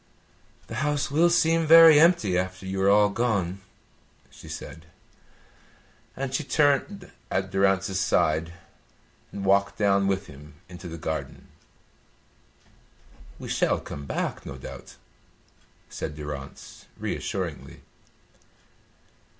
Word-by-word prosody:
"The -, -, -7 dB
house 150 Hz, -2 st, -1 dB
will 165 Hz, +4 st, +4 dB
seem 165 Hz, -1 st, +2 dB
very 165 Hz, -1 st, +9 dB
empty 160 Hz, -, +3 dB
after 95 Hz, +1 st, -3 dB
you 95 Hz, 0 st, -3 dB
are 95 Hz, -, +3 dB
all 105 Hz, 0 st, +5 dB
gone," 100 Hz, -5 st, -1 dB, 0.7 s
she -, -, -14 dB
said; 80 Hz, 0 st, -9 dB, 1.3 s
and 135 Hz, -1 st, -4 dB
she 145 Hz, -, -1 dB
turned 150 Hz, +7 st, 0 dB, 0.2 s
at 95 Hz, 0 st, -2 dB
Durrance's 95 Hz, -1 st, +1 dB
side 80 Hz, -1 st, +1 dB, 0.8 s
and 100 Hz, -1 st, -6 dB
walked 100 Hz, +1 st, +2 dB
down 100 Hz, -1 st, +2 dB
with 95 Hz, 0 st, -1 dB
him 75 Hz, 0 st, -14 dB
into 90 Hz, 0 st, -10 dB
the 85 Hz, 0 st, -7 dB
garden. 80 Hz, -1 st, -6 dB, 1.9 s
"We -, -, -9 dB
shall -, -, +1 dB
come 70 Hz, -1 st, -9 dB
back, -, -, -3 dB
no 70 Hz, -, -8 dB
doubt," 65 Hz, -, -11 dB, 0.9 s
said 75 Hz, -, -6 dB
Durrance, 75 Hz, -2 st, -9 dB
reassuringly. -, -, -5 dB
100 Hz, 110 wpm, -25 LUFS, 90-140 Hz, 1.9 s, very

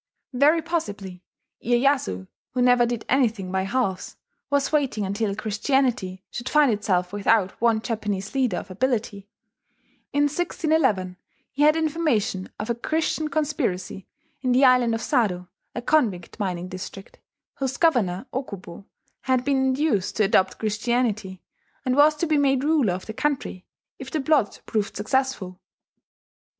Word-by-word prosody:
Very 300 Hz, +6 st, +4 dB
possibly 205 Hz, -, -4 dB, 0.4 s
Iyeyasu, 240 Hz, -, +1 dB, 0.3 s
who 250 Hz, -, +1 dB
never 245 Hz, -1 st, +5 dB
did 235 Hz, -2 st, -3 dB
anything 225 Hz, -8 st, +1 dB
by 190 Hz, 0 st, 0 dB
halves, 195 Hz, -4 st, -2 dB, 0.3 s
was 285 Hz, 0 st, +1 dB
waiting 275 Hz, -9 st, 0 dB
until 200 Hz, +1 st, -1 dB
Christianity 215 Hz, -3 st, 0 dB
should 240 Hz, +1 st, -5 dB
find 295 Hz, -3 st, +4 dB
itself 185 Hz, -3 st, 0 dB
without 205 Hz, -1 st, +2 dB
one 230 Hz, -2 st, +3 dB
Japanese 210 Hz, -3 st, -3 dB
leader 255 Hz, -9 st, +1 dB
of 190 Hz, -, -7 dB
ability. 210 Hz, -2 st, -2 dB, 0.8 s
In 290 Hz, -, +2 dB
1611 290 Hz, -, 0 dB, 0.3 s
he 285 Hz, -, -4 dB
had 300 Hz, +1 st, +6 dB
information 300 Hz, -, 0 dB
of 220 Hz, +3 st, -3 dB
a -, -, +2 dB
Christian 315 Hz, +5 st, -1 dB
conspiracy 275 Hz, -12 st, -2 dB, 0.3 s
in 255 Hz, -2 st, +1 dB
the 260 Hz, +2 st, +5 dB
island 250 Hz, -3 st, +4 dB
of 225 Hz, -, -4 dB
Sado 190 Hz, -, 0 dB, 0.3 s
(a 240 Hz, -, -4 dB
convict 230 Hz, -, 0 dB
mining 180 Hz, -3 st, -2 dB
district) 185 Hz, +1 st, -9 dB, 0.4 s
whose 265 Hz, -1 st, -2 dB
governor, 235 Hz, -, +2 dB
Okubo, 200 Hz, -8 st, -6 dB, 0.4 s
had 255 Hz, -1 st, +1 dB
been 280 Hz, -1 st, +2 dB
induced 265 Hz, -6 st, +1 dB
to 215 Hz, -, +2 dB
adopt 190 Hz, -1 st, +2 dB
Christianity, 215 Hz, -3 st, -1 dB, 0.4 s
and 255 Hz, 0 st, +1 dB
was 300 Hz, +2 st, +5 dB
to 300 Hz, -, -1 dB
be 305 Hz, -2 st, +2 dB
made 270 Hz, -2 st, +2 dB
ruler 290 Hz, -, +2 dB
of 185 Hz, -, -6 dB
the 220 Hz, -, -6 dB
country 265 Hz, -8 st, -2 dB, 0.3 s
if 265 Hz, -1 st, -7 dB
the 310 Hz, -, -2 dB
plot 275 Hz, -6 st, +1 dB
proved 210 Hz, -2 st, -2 dB
successful. 210 Hz, -5 st, -1 dB
240 Hz, 140 wpm, -24 LUFS, 195-275 Hz, 0.8 s, had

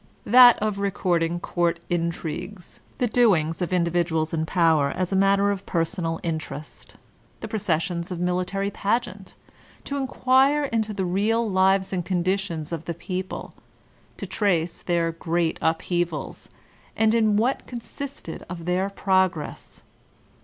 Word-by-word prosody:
that 245 Hz, +1 st, +8 dB
of 210 Hz, -1 st, -2 dB
recording 175 Hz, -4 st, 0 dB
court 170 Hz, -1 st, 0 dB
intrigues, 175 Hz, +2 st, -4 dB, 0.2 s
the 250 Hz, -, +1 dB
doings 195 Hz, -9 st, +2 dB
of 180 Hz, -, -2 dB
individuals 170 Hz, -2 st, 0 dB
in 160 Hz, -1 st, -1 dB
power 160 Hz, -5 st, +3 dB
as 180 Hz, +4 st, -2 dB
a -, -, +2 dB
matter 195 Hz, +1 st, +3 dB
of 200 Hz, -1 st, -4 dB
personal 165 Hz, -1 st, -1 dB
interest, 155 Hz, -2 st, -6 dB, 0.5 s
the -, -, -4 dB
processions 170 Hz, -4 st, -1 dB
of 180 Hz, -2 st, -5 dB
military 180 Hz, +3 st, -1 dB
pageant, 200 Hz, -2 st, -2 dB, 0.5 s
to 280 Hz, -, -4 dB
inquire 270 Hz, +2 st, +3 dB
into 225 Hz, -5 st, -1 dB
the 195 Hz, -2 st, -2 dB
real 215 Hz, +6 st, +1 dB
lives 190 Hz, 0 st, +2 dB
and 180 Hz, -2 st, -1 dB
conditions 180 Hz, -3 st, -1 dB
of 165 Hz, -1 st, -4 dB
the 170 Hz, -, -4 dB
people, 185 Hz, +2 st, -5 dB, 0.6 s
to -, -, -5 dB
trace 175 Hz, -5 st, 0 dB
their 170 Hz, -1 st, 0 dB
great 165 Hz, 0 st, -1 dB
upheavals, 165 Hz, -1 st, -2 dB, 0.5 s
and 220 Hz, 0 st, +3 dB
in 215 Hz, -3 st, +3 dB
what 245 Hz, +5 st, 0 dB
consisted 260 Hz, -, -7 dB
their 180 Hz, +2 st, -1 dB
progress. 190 Hz, -5 st, -1 dB
185 Hz, 130 wpm, -24 LUFS, 170-205 Hz, 0.6 s, that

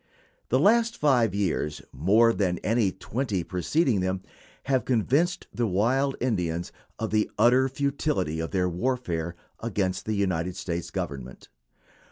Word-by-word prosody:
The -, -, +3 dB
last 230 Hz, +2 st, +3 dB
five 120 Hz, -9 st, +3 dB
years, 80 Hz, -6 st, -1 dB
more 105 Hz, -, +4 dB
than 90 Hz, -5 st, 0 dB
any 110 Hz, -3 st, +2 dB
twenty 100 Hz, +1 st, -3 dB
preceding 105 Hz, -, +1 dB
them, 95 Hz, 0 st, -1 dB, 0.4 s
have 130 Hz, -3 st, +1 dB
convinced 135 Hz, -, +1 dB
the 120 Hz, -1 st, 0 dB
wild 130 Hz, +8 st, +1 dB
Indians 90 Hz, -8 st, -1 dB, 0.3 s
of 110 Hz, -, -3 dB
the 110 Hz, 0 st, +2 dB
utter 130 Hz, +2 st, +4 dB
futility 140 Hz, -, -1 dB
of 80 Hz, -, -2 dB
their 90 Hz, -2 st, +1 dB
warfare 90 Hz, -4 st, -2 dB, 0.2 s
against 100 Hz, -5 st, -2 dB
the 110 Hz, -, 0 dB
United 90 Hz, -3 st, -1 dB
States 85 Hz, -3 st, -4 dB
Government. 65 Hz, -2 st, -6 dB
105 Hz, 135 wpm, -26 LUFS, 90-130 Hz, 0.4 s, more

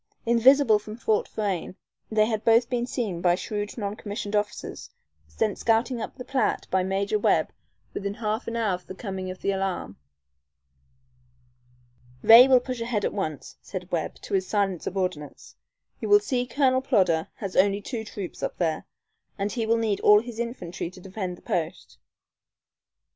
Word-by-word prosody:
Invisible 235 Hz, 0 st, +5 dB
from 215 Hz, +1 st, -9 dB
Fort 220 Hz, -2 st, 0 dB
Frayne, 195 Hz, -4 st, -3 dB, 0.3 s
they 215 Hz, -1 st, +3 dB
had 220 Hz, -1 st, -2 dB
both 230 Hz, +2 st, +4 dB
been 245 Hz, -1 st, 0 dB
seen 210 Hz, -10 st, -3 dB
by 175 Hz, 0 st, +4 dB
shrewd 205 Hz, +3 st, -4 dB
non 205 Hz, -2 st, -3 dB
commissioned 205 Hz, 0 st, -5 dB
officers, 210 Hz, 0 st, -3 dB, 0.4 s
sent 75 Hz, -, -2 dB
scouting 230 Hz, +2 st, +1 dB
up -, -, -6 dB
the 250 Hz, -, -8 dB
Platte 260 Hz, -5 st, 0 dB
by 190 Hz, -, +3 dB
Major 195 Hz, +3 st, 0 dB
Webb -, -, +2 dB, 0.4 s
within 200 Hz, 0 st, -3 dB
half 220 Hz, +1 st, -3 dB
an 230 Hz, -, -3 dB
hour 220 Hz, -4 st, +1 dB
of 180 Hz, 0 st, -6 dB
the 190 Hz, -, -8 dB
coming 190 Hz, -2 st, -5 dB
of 185 Hz, -, -8 dB
the 200 Hz, -, +2 dB
alarm. 190 Hz, -, -3 dB, 2.3 s
"Ray 235 Hz, +3 st, +10 dB
will 260 Hz, -1 st, +6 dB
push 250 Hz, -1 st, -5 dB
ahead 230 Hz, -3 st, -1 dB
at -, -, -1 dB
once," 155 Hz, -8 st, -4 dB
said 185 Hz, -1 st, -7 dB
Webb, 165 Hz, -3 st, -2 dB
to -, -, -7 dB
his 190 Hz, -1 st, +1 dB
silent 195 Hz, -5 st, 0 dB
subordinates. 180 Hz, -6 st, -4 dB, 0.4 s
"You 415 Hz, 0 st, +5 dB
see 255 Hz, -11 st, -1 dB
Colonel 260 Hz, -1 st, +2 dB
Plodder 185 Hz, -, +2 dB
has 195 Hz, -3 st, -6 dB
only 200 Hz, +1 st, +4 dB
two 220 Hz, +2 st, -5 dB
troops 200 Hz, -4 st, -7 dB
up -, -, -3 dB
there, 160 Hz, -3 st, -1 dB, 0.5 s
and 200 Hz, 0 st, -2 dB
he 230 Hz, -3 st, -2 dB
will 230 Hz, +1 st, +3 dB
need 220 Hz, -3 st, 0 dB
all 210 Hz, 0 st, +7 dB
his 235 Hz, -1 st, -9 dB
infantry 180 Hz, -8 st, -4 dB
to 185 Hz, -, -14 dB
defend 185 Hz, -1 st, -5 dB
the -, -, -20 dB
post. 170 Hz, +1 st, -4 dB
210 Hz, 170 wpm, -26 LUFS, 185-230 Hz, 2.3 s, Ray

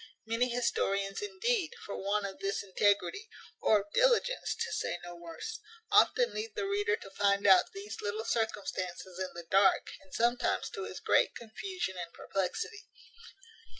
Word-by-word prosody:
Many 230 Hz, +3 st, +1 dB
historians, 200 Hz, -5 st, 0 dB
indeed, 415 Hz, -2 st, 0 dB
for 200 Hz, -, -5 dB
want 200 Hz, +1 st, 0 dB
of 195 Hz, -1 st, -6 dB
this 195 Hz, +1 st, -1 dB
integrity, 205 Hz, -, +1 dB, 0.3 s
or 215 Hz, -2 st, +4 dB
of 205 Hz, +1 st, -16 dB
diligence, -, -, +3 dB
to -, -, -3 dB
say -, -, -1 dB
no 175 Hz, 0 st, -8 dB
worse, 170 Hz, -1 st, -7 dB, 0.3 s
often 485 Hz, -1 st, +5 dB
leave 430 Hz, 0 st, -4 dB
the 415 Hz, -2 st, -1 dB
reader 410 Hz, +3 st, +1 dB
to 195 Hz, -, -11 dB
find 200 Hz, 0 st, +2 dB
out 190 Hz, -2 st, +6 dB
these 205 Hz, +2 st, -7 dB
little 210 Hz, +2 st, -3 dB
circumstances 190 Hz, -5 st, -2 dB
in 185 Hz, -1 st, -2 dB
the 170 Hz, -1 st, -7 dB
dark, 195 Hz, +2 st, +4 dB
and 190 Hz, -, -21 dB
sometimes 240 Hz, +3 st, +1 dB
to -, -, -5 dB
his -, -, -7 dB
great -, -, +3 dB
confusion 235 Hz, -, -5 dB
and 170 Hz, -1 st, -5 dB
perplexity. 420 Hz, -, -3 dB
205 Hz, 155 wpm, -32 LUFS, -, 0.3 s, out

